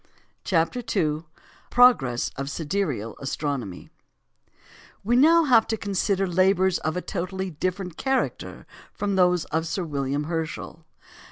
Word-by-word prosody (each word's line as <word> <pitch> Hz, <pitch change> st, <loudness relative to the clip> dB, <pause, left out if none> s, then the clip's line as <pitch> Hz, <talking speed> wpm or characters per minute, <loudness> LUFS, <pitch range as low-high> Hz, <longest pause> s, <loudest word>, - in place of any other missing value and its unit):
] -, -, -43 dB
CHAPTER 165 Hz, +6 st, +1 dB, 0.2 s
II 155 Hz, -3 st, 0 dB, 0.4 s
PROGRESS 150 Hz, -, +4 dB
OF 135 Hz, +1 st, -4 dB
SIDEREAL 145 Hz, -, -3 dB
ASTRONOMY 135 Hz, -, -4 dB, 1.1 s
We 235 Hz, +4 st, +2 dB
have -, -, +6 dB
now 315 Hz, -7 st, +6 dB
to 220 Hz, 0 st, -3 dB
consider 195 Hz, -1 st, 0 dB
labours 185 Hz, 0 st, +2 dB
of 155 Hz, +2 st, -2 dB
a 180 Hz, -, -3 dB
totally 190 Hz, 0 st, -4 dB
different 180 Hz, +2 st, -3 dB
character 265 Hz, -1 st, -2 dB, 0.3 s
from 200 Hz, -1 st, -2 dB
those 180 Hz, -2 st, +3 dB
of 160 Hz, +1 st, 0 dB
Sir 185 Hz, +3 st, -2 dB
William 140 Hz, -2 st, -2 dB
Herschel. 160 Hz, 0 st, -5 dB
180 Hz, 125 wpm, -25 LUFS, 150-195 Hz, 1.1 s, have